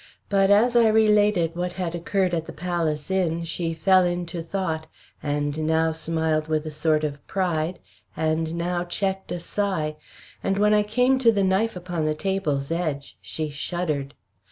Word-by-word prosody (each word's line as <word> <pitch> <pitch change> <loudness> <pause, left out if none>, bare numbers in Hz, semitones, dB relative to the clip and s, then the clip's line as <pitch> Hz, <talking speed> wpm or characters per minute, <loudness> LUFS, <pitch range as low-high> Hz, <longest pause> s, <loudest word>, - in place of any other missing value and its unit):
But 195 -1 +3
as 225 +4 +4
I 235 -1 +6
related 210 -6 +3
what 180 +1 -2
had 180 -3 -3
occurred 180 +2 0
at 165 -1 -1
the - - -6
Palace 165 -2 -2
Inn, 170 -3 0
she 165 0 -3
fell 185 +3 +4
into 175 -1 -2
thought, 165 -2 -3 0.3
and 145 0 -1
now 160 0 +2
smiled 160 -1 -1
with 155 -1 0
a 155 - -4
sort 155 0 +1
of 145 -2 -3
pride, 175 -2 -1 0.4
and 160 +1 0
now 175 +1 -1
checked 190 +2 -3
a 175 - -2
sigh; 170 -5 -2 0.4
and 195 - 0
when 210 +1 +4
I 210 - +5
came 250 +5 +2
to 235 -3 +5
the 200 -3 +1
knife 195 +4 +1
upon 175 -3 -3
the 155 0 0
table's 155 -6 -1
edge 155 -5 -3
she 155 -1 -4
shuddered. 145 -2 -3
170 Hz, 170 wpm, -24 LUFS, 155-195 Hz, 0.4 s, I